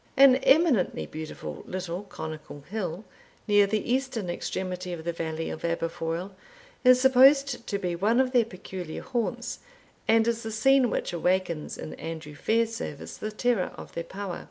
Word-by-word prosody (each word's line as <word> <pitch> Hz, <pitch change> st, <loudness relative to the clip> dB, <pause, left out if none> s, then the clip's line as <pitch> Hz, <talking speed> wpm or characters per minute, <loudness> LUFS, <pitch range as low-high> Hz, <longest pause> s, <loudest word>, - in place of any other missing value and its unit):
An 270 Hz, -1 st, +8 dB
eminently 270 Hz, -, +3 dB
beautiful 155 Hz, -, -7 dB
little 180 Hz, -1 st, -4 dB
conical 155 Hz, -6 st, -8 dB
hill, 185 Hz, +2 st, -4 dB, 0.4 s
near 205 Hz, -1 st, +5 dB
the 215 Hz, +1 st, -1 dB
eastern 255 Hz, -8 st, -1 dB
extremity 180 Hz, 0 st, -4 dB
of 165 Hz, -2 st, -6 dB
the 170 Hz, +1 st, -2 dB
valley 160 Hz, -1 st, -3 dB
of -, -, -7 dB
Aberfoil, 170 Hz, +2 st, -2 dB, 0.5 s
is 255 Hz, -1 st, +7 dB
supposed 265 Hz, 0 st, +5 dB
to 200 Hz, -, -1 dB
be 180 Hz, -3 st, -2 dB
one 215 Hz, +7 st, +2 dB
of 260 Hz, -1 st, +2 dB
their 245 Hz, -3 st, +4 dB
peculiar 185 Hz, -4 st, -7 dB
haunts, 240 Hz, -3 st, -2 dB, 0.5 s
and 225 Hz, 0 st, +4 dB
is 230 Hz, -1 st, 0 dB
the 220 Hz, -, -5 dB
scene 260 Hz, +3 st, +4 dB
which -, -, -2 dB
awakens, 175 Hz, -2 st, 0 dB
in -, -, -7 dB
Andrew 160 Hz, -2 st, -6 dB
Fairservice, 225 Hz, -4 st, -2 dB
the 215 Hz, -, -3 dB
terror 225 Hz, -3 st, 0 dB
of -, -, -10 dB
their 170 Hz, -, -3 dB
power. 190 Hz, +1 st, -5 dB
195 Hz, 155 wpm, -27 LUFS, 170-235 Hz, 0.5 s, An